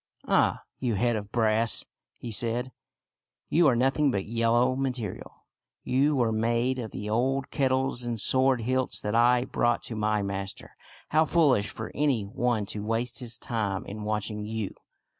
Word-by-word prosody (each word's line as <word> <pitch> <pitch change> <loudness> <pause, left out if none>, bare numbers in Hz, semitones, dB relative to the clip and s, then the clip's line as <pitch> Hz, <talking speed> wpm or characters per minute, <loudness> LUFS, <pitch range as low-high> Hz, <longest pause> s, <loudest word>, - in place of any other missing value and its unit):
" - - -37
Ah, - - +2 0.2
you 120 -4 0
head 120 +3 +1
of 105 -1 -5
brass," 110 0 +2 0.3
he 120 - -7
said, 120 +3 0 0.4
" - - -56
you 165 0 +5
are 130 - +4
noth 135 +4 +1
ing 150 -2 +4
but 100 -6 -1
yellow 120 +3 +2
metal. 125 -6 -4 0.4
You 140 +4 +2
were 120 -4 +2
made 115 +3 0
of 115 -3 -4
the 105 - -6
old 130 +5 0
kettles 130 -2 0
and 120 -2 -3
sword 130 +2 +2
hilts 130 +2 -1
that 105 - -3
I 120 +2 +4
brought 120 -2 0
to 115 - -5
my 105 -1 0
master. 100 0 -5 0.4
How 155 +1 +4
foolish 140 -12 +3
for 110 - -6
any 140 -7 +1
one 115 +1 -1
to 105 - -5
waste 115 +2 -2
his 120 -2 -3
time 105 -5 -2
in 105 +2 -7
watching 105 0 -2
you 110 -1 -4
120 Hz, 175 wpm, -27 LUFS, 110-130 Hz, 0.4 s, you